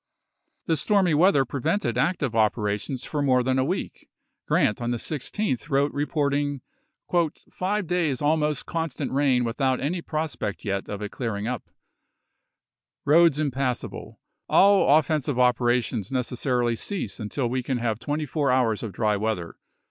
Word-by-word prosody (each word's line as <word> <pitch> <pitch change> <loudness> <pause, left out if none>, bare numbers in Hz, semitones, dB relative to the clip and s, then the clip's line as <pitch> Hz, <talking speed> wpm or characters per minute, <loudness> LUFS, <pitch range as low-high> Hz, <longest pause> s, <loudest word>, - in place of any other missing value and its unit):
The 160 - +1
stormy 190 +2 +2
weather 150 -3 +4
prevented 140 - -1
active 140 0 0
operalfions 110 +3 0
for 150 - -2
more 130 -3 +3
than 130 +1 +1
a - - +3
week. 175 +8 -4 0.4
Grant 105 - +2
on 120 - -1
the 120 - 0
16th 150 - -3
wrote 140 +1 +1
reporting 145 -1 -1 0.4
" 170 -2 -1
five 200 +2 -1
days 165 -6 0
almost 150 -1 +1
constant 165 -5 -3
rain 135 -2 +2
without 130 +2 0
any 170 +6 -2
prospect 155 -11 -4
yet 100 -1 -2
of 105 0 -5
it 105 - -5
clearing 110 -5 -3
up 125 0 -4 0.7
"; - - -59
roads 165 0 +5
impass 135 -4 -1
able; - - -10 0.3
"all 195 -7 +6
offensive 150 -3 0
operations 120 -3 +1
necessarily 125 -1 0
cease 195 - -3
un 105 -2 -5
til 130 0 -1
we 130 +2 -1
can 130 0 -2
have 115 -2 -1
twenty 150 +3 -2
four 145 0 -1
hours 120 -4 +2
of 110 -4 -5
dry 105 +1 +1
weather." 105 -5 -2
135 Hz, 155 wpm, -25 LUFS, 120-155 Hz, 0.7 s, all